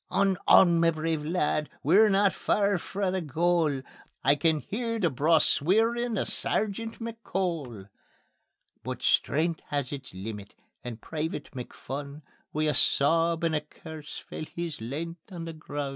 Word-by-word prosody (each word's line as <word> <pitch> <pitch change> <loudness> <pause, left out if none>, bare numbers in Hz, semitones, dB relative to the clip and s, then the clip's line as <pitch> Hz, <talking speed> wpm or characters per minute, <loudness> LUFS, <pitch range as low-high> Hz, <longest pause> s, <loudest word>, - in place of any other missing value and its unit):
"On, 195 -1 +2
on, 170 -2 +7
ma 165 0 +5
brave 160 -1 -1
lad! 150 -2 0
We're 200 +9 +6
no 200 0 +4
faur 200 -2 +1
frae 195 +2 -2
the 185 0 -1
goal; 160 -2 +1 0.4
I 140 - +6
can 155 +1 +2
hear 230 +1 -3
the 175 -7 +1
braw 155 +5 +4
sweerin' 225 +10 +2
o' - - +1
Sergeant 220 +2 -1
McCole." 180 - -4 1.0
But - - -5
strength 160 +2 +2
has 140 -3 -2
its 140 -2 -6
leemit, 100 +1 -7 0.3
and 120 -2 -6
Private 155 +2 -4
McPhun, 140 +3 -7 0.3
Wi' 155 - -1
a 150 -1 +2
sab 165 +5 +3
and 165 -1 +1
a 150 - +1
curse 155 0 -10
fell 155 - -7
his 170 -7 -4
length 165 - -6
on 170 -2 -6
the 165 - -6
grun'. 145 -3 -5
165 Hz, 150 wpm, -28 LUFS, 145-190 Hz, 1.0 s, on